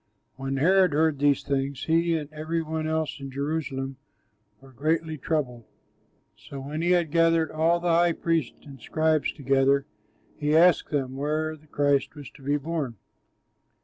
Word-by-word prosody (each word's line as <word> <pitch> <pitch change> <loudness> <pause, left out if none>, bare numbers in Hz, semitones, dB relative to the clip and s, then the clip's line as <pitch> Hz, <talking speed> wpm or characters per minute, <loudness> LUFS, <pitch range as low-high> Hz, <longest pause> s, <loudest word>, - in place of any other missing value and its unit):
When 135 0 -3
Herod 185 +3 +4
heard 155 -1 +2
these 145 -1 +2
things, 140 0 -2
he 165 +1 +2
and 150 -2 -5
every 160 +2 -2
one 160 0 -3
else 160 -2 -2
in 135 0 -7
Jerusalem 135 -1 -3 0.6
were 135 +1 -17
greatly 155 +4 -1
troubled. 130 -6 -3 0.7
So 140 - -10
when 145 +4 -5
he 170 - +1
had 175 -4 +2
gathered 165 -1 +3
all 165 +2 +2
the 170 -1 +1
high 170 0 +4
priests 165 -5 -2
and 135 -4 -12
scribes 155 +2 +1
together, 135 0 +2 0.5
he 150 +1 +2
asked 175 +1 +4
them 135 -3 -2
where 155 +2 -1
the 155 0 -21
Christ 145 -1 +1
was 145 -3 -10
to 150 - -18
be 145 +2 0
born. 145 -4 -3
150 Hz, 160 wpm, -26 LUFS, 140-160 Hz, 0.7 s, Herod